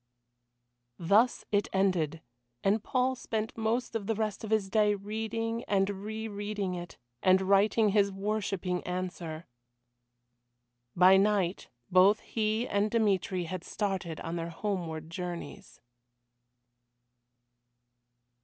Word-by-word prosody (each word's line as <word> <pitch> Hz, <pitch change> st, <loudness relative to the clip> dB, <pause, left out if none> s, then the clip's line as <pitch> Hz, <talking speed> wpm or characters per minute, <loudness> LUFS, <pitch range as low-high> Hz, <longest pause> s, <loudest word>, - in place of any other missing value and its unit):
Thus 205 Hz, +9 st, +3 dB
it 205 Hz, -1 st, +2 dB
ended. 175 Hz, -5 st, +1 dB, 0.4 s
And 205 Hz, +2 st, +2 dB
Paul 255 Hz, 0 st, +1 dB
spent 220 Hz, -3 st, -3 dB
most 230 Hz, +2 st, -1 dB
of 205 Hz, -3 st, -3 dB
the 225 Hz, -, +1 dB
rest 215 Hz, -1 st, -2 dB
of 220 Hz, -, -5 dB
his 215 Hz, -3 st, +1 dB
day 210 Hz, 0 st, +3 dB
reading 225 Hz, +3 st, -3 dB
and 195 Hz, 0 st, +1 dB
re 220 Hz, +1 st, -4 dB
reading 205 Hz, -2 st, -3 dB
it, 175 Hz, -1 st, -7 dB, 0.2 s
and 185 Hz, 0 st, +4 dB
writing 205 Hz, +3 st, +4 dB
his 200 Hz, 0 st, +3 dB
worshipping 195 Hz, -2 st, -2 dB
answer. 180 Hz, -3 st, -4 dB, 1.5 s
By 185 Hz, +2 st, +7 dB
night 195 Hz, -2 st, +1 dB, 0.2 s
both 190 Hz, +4 st, +5 dB
he 220 Hz, +2 st, -1 dB
and 205 Hz, +1 st, +1 dB
Dmitry 200 Hz, -5 st, +1 dB
had 175 Hz, +1 st, -5 dB
started 190 Hz, -6 st, -3 dB
on 165 Hz, +1 st, -4 dB
their 165 Hz, 0 st, -3 dB
homeward 165 Hz, -4 st, -4 dB
journeys. 180 Hz, +3 st, -7 dB
200 Hz, 115 wpm, -30 LUFS, 180-215 Hz, 1.5 s, By